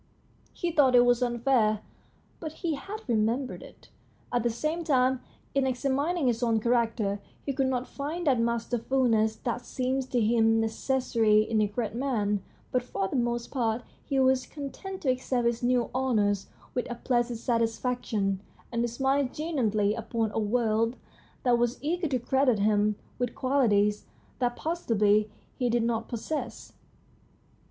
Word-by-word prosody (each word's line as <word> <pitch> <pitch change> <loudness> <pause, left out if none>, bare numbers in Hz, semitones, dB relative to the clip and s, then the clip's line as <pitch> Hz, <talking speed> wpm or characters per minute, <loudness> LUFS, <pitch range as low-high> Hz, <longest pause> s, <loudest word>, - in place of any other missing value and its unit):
He 345 - -2
thought 275 -5 +4
it 245 0 +7
was 245 0 +3
unfair, 240 -3 +2 0.6
but 315 -2 -5
he 330 0 -2
had 395 +8 -7
remembered 235 +3 0
it. - - -15 0.4
At 245 - +2
the 240 - +1
same 305 +9 -2
time, 260 -4 +2 0.3
in 275 -1 +2
examin 275 +6 0
ing 315 - 0
his 240 -1 +1
own 230 -2 +2
character, 225 -3 +1 0.3
he 275 - -1
could 270 0 +1
not 255 -1 -1
find 310 +5 -4
that 265 -5 +3
masterfulness 230 -1 +1
that 245 0 -2
seemed 260 +1 -2
to 245 - +1
him 225 0 +3
necessary 225 -2 +2
in 220 0 +1
a 210 - +3
great 210 +1 -3
man. 220 -6 0 0.3
But 250 - +2
for 195 -5 -3
the - - -4
most 240 -1 -1
part 235 -3 0 0.2
he 275 -2 0
was 260 -1 +3
content 340 +7 -7
to 265 - +3
accept 255 -1 -1
his 235 0 +1
new 245 -1 +1
honours 215 -6 +1 0.3
with 245 - -2
a 240 - -3
placid 240 -1 0
satisfaction, 230 -4 0 0.3
and 235 -1 0
to 240 - +1
smile 265 +3 +1
genially 220 -10 0
upon 225 -1 -2
a - - -1
world 225 +1 +1 0.5
that 245 -2 +3
was 240 +1 +1
eager 335 +4 -1
to 265 -3 0
credit 255 0 +2
him 210 0 +2 0.2
with 245 -1 -2
qualities 210 -6 +2 0.3
that 245 -1 +1
possibly 215 -10 +1 0.3
he 250 -2 +1
did 235 0 +2
not 230 -1 -1
possess. 250 +6 -4
240 Hz, 160 wpm, -28 LUFS, 225-265 Hz, 0.6 s, it